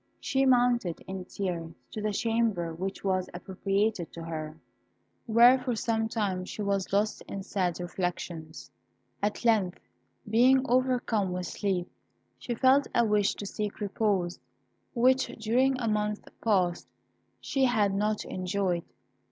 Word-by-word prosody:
She 270 0 +1
mounted 245 -8 +2
in 190 -1 -6
tears 175 -4 -4 0.2
to 215 - -5
the 215 0 0
chamber 220 -6 0
which 190 +4 -5
was 185 -1 0
appropriated 195 0 -1
to 165 - -7
her, 155 -1 -5 0.7
where 240 +3 +7
for 250 -2 -2
some 225 0 0
time 200 -5 -1
she 210 +3 -5
was 200 -1 -1
lost 205 +2 +1
in 195 - -5
sad 185 -3 -1
reflections. 175 -3 -5 0.5
At 210 +3 -2
length, 205 -6 +2 0.5
being 255 +4 +4
overcome 245 -6 +1
with 180 0 -3
sleep, 190 -3 -2 0.5
she 240 - -3
felt 265 +4 +4
a 235 - +4
wish 210 -2 +2
to 205 - -6
seek 210 +1 -4
repose, 200 -4 0 0.6
which, 255 +2 +4
during 255 +4 +2
a 235 - -1
month 210 -1 -1 0.2
past, 185 -6 +1 0.5
she 270 -2 +1
had 215 -6 +2
not 210 +2 0
enjoyed. 185 -2 -1
205 Hz, 135 wpm, -29 LUFS, 185-230 Hz, 0.7 s, where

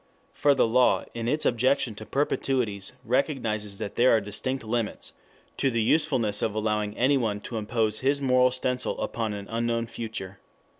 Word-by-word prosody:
For 145 -1 +3
the - - +4
law 125 +2 +3
in 115 -1 -4
its 150 +5 0
objection 125 0 +2
to 110 +1 -10
perpetuities 125 -8 -1
recognizes 115 -6 -1
that 105 -1 -6
there 125 +2 +5
are - - +3
distinct 115 +6 -3
limits 115 0 -3 0.4
to 135 - +2
the 115 -3 0
usefulness 125 -7 +2
of 110 - -1
allowing 105 -1 -1
anyone 120 -5 +2
to 115 - -5
impose 110 0 -1
his 140 +2 +1
moral 130 -2 +4
stencil 125 0 -2
upon 110 -2 -2
an 100 -1 -7
unknown 115 0 -1
future. 110 -4 -7
115 Hz, 160 wpm, -26 LUFS, 110-130 Hz, 0.4 s, there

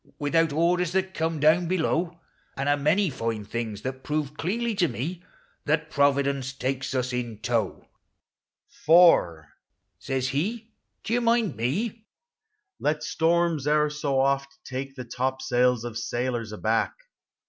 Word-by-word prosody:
Without 160 +2 +2
orders 170 +3 +1
that 190 0 0
come 160 -1 -1
down 160 +4 +4
below; 170 -1 0 0.4
And 135 +1 -2
a 145 - +4
many 155 +6 +2
line 115 -4 -3
things 110 -2 -4
that 130 0 -4
proved 150 -1 -2
deafly 230 +9 -1
to 175 - +4
mo 160 +8 -4 0.4
That 150 +1 0
Providence 140 -2 +1
takes 135 0 -3
us 125 0 -1
in 120 -3 -3
tow: 110 -3 -1
u - - -29 0.8
For," 90 - +4 0.5
says 130 -1 -2
he. 215 - -2 0.3
do 225 - -2
you 245 - +2
mind 230 -6 +2
me, 210 - -2 0.3
" 425 -2 -53
let 150 0 -2
storms 165 -2 +1
e'er 150 0 +3
so 145 -3 -1
oft 140 0 0
Take 135 +1 -5
the 125 -2 -7
topsails 125 -1 0
of 115 -2 -4
sailors 120 -1 -2
aback. 110 +1 0
145 Hz, 145 wpm, -26 LUFS, 125-170 Hz, 0.8 s, down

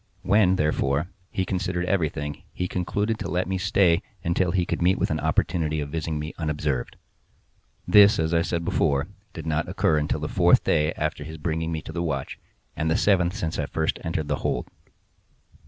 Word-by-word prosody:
When, 95 -2 +4
therefore, 75 +1 0 0.2
he 95 - -1
considered 90 -1 -2
everything 75 -6 -1
he 90 - -2
concluded 100 +5 -1
to - - -4
let 90 +2 0
me 95 0 -1
stay 95 -3 +3 0.2
until 85 +2 +1
he 90 0 +1
could - - -3
meet 90 +2 +3
with - - 0
an - - 0
opportunity 80 -3 0
of 70 -1 -3
visiting 80 -1 -2
me 75 +2 -5
unobserved. 75 -5 -2 0.9
This, 105 0 +7
as 80 +1 0
I 85 - +4
said 85 0 -2
before, 70 -1 +1 0.2
did 80 - -7
not 75 -1 -1
occur 75 -1 +2
until 75 - -1
the - - -2
fourth - - +4
day 75 +1 +2
after 75 0 -3
his 80 +2 -8
bringing 80 +1 -2
me 80 -1 -3
the 85 +2 -4
watch, 70 -6 -3 0.4
and 80 - -1
the 80 - +2
seventh 90 -2 +2
since 80 -8 -3
I - - +2
had 70 - -4
first 80 0 -1
entered 80 -3 -2
the - - 0
hold. - - -2
80 Hz, 190 wpm, -25 LUFS, 75-90 Hz, 0.9 s, This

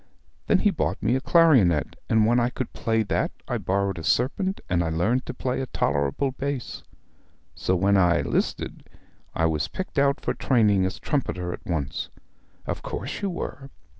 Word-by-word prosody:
Then - - +5
he 205 - +3
bought 165 - -2
me 115 +5 +2
a 130 - 0
clarionet, 130 - +4
and 110 -1 +4
when 120 +2 +3
I 120 0 +2
could 130 -1 -5
play 115 -1 0
that 100 - 0 0.2
I - - -1
borrowed 100 -1 -1
a - - -7
serpent, 185 - 0
and 85 -1 +1
I 80 - -1
learned 105 +11 0
to - - -4
play 130 +1 -2
a 130 - -3
tolerable 70 - 0
bass. 135 -1 -4 0.7
So 95 - 0
when 100 +3 +3
I 90 -2 +3
'listed - - -2 0.5
I 80 - +2
was 75 -3 0
picked 185 -6 -4
out 140 0 +3
for - - -2
training 105 -7 +3
as 95 - -5
trumpeter 90 - -2
at - - -9
once.' 75 -6 -2 0.6
'Of - - -3
course - - -5
you 200 - 0
were.' 140 -6 -6
110 Hz, 180 wpm, -25 LUFS, 90-135 Hz, 0.7 s, Then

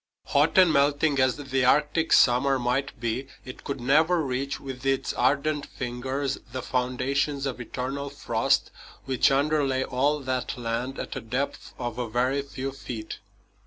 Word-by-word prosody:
Hot - - +3
and 180 -4 +7
melting 145 +1 +2
as 130 -1 +3
the 135 -2 -1
Arctic 150 +5 +2
summer 130 +2 +5
might 125 +2 -1
be, 120 +3 -2 0.2
it 130 - -9
could 140 -1 -4
never 155 +8 +3
reach 135 +1 -2
with 135 -1 -8
its 135 0 0
ardent 145 +3 +1
fingers 130 +3 -3
the 130 0 -4
foundations 130 +3 -1
of 130 -2 -3
eternal 135 +4 -4
frost 140 - 0 0.3
which 130 -2 +3
underlay 140 -1 +1
all 140 +4 +1
that 130 -2 -3
land 120 +3 -3
at - - -5
a 135 - -4
depth 125 +5 -4
of 120 -1 -4
a 120 -2 -2
very 125 +5 +1
few 135 -1 -5
feet. 115 -5 -7
135 Hz, 155 wpm, -26 LUFS, 125-140 Hz, 0.3 s, and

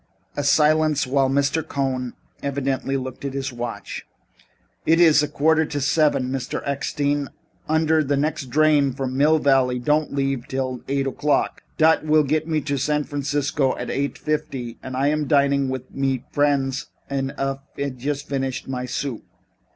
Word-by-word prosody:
A 145 - -1
silence 150 0 +3
while 135 +1 +2
B. 140 +1 +3 0.3
Cohn 130 -3 -2 0.3
evidently 135 -1 -1
looked 130 0 -6
at 140 -1 -4
his 135 -1 -3
watch. 120 -1 -5 0.8
"It 165 +1 +3
iss 160 -3 +6
now 150 - 0
a - - -19
quarter 160 +2 +3
of 145 -3 -2
seven, 145 -3 +2
Mr. 130 -2 -3
Eckstein, 140 0 -1 0.4
und 160 0 +2
der 160 0 +4
nexd 145 0 -1
drain 145 -1 +3
from 130 0 -3
Mill 150 +3 +4
Valley 135 -4 +3
don't 150 +5 +1
leaf 135 -1 0
until 130 -2 -3
eight 135 0 0
o'clock. 145 +2 0 0.2
Dot 160 +1 +5
vill 155 0 +4
get 155 +3 0
me 155 -2 0
to 140 0 -2
San 150 +2 +1
Francisco 145 -1 -1
at - - -4
eight 140 +1 -2
fifty 130 -6 -3
und 130 0 -6
I 140 +2 +2
am 150 -1 0
dining 140 -2 +3
mit 130 0 -2
friends 140 -1 +1 0.2
und 135 0 -2
haf 135 0 -1 0.4
just 140 +3 -3
finished 135 -2 -3
my 125 -1 -3
soup." 125 -1 -3
140 Hz, 160 wpm, -23 LUFS, 135-150 Hz, 0.8 s, iss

